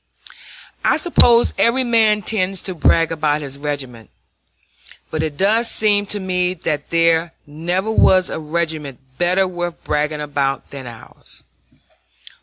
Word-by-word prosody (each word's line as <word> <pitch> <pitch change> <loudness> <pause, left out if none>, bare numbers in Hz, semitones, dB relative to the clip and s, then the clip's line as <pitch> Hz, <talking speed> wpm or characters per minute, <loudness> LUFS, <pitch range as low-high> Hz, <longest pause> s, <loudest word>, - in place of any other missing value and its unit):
I - - +3
suppose 240 -9 +4
every 250 +3 +3
man 220 -3 +2
tends 195 -2 0
to 185 - -4
brag 165 -1 +2
about 150 -2 -1
his 140 0 -8
regiment; 135 -6 -6 1.0
but 155 - -2
it 155 -2 -4
does 220 +4 +2
seem 205 -1 +2
to 205 - -2
me 180 -1 -1
that 150 -4 -4
there 165 0 +2
never 175 +8 -3
was 185 -4 +4
a - - -5
regiment 155 -3 -3 0.2
better 180 +2 +2
worth 175 -1 -5
bragging 150 0 -1
about 140 -2 -2
than 135 -3 -8
ours. 115 -2 -13
170 Hz, 135 wpm, -19 LUFS, 150-195 Hz, 1.0 s, suppose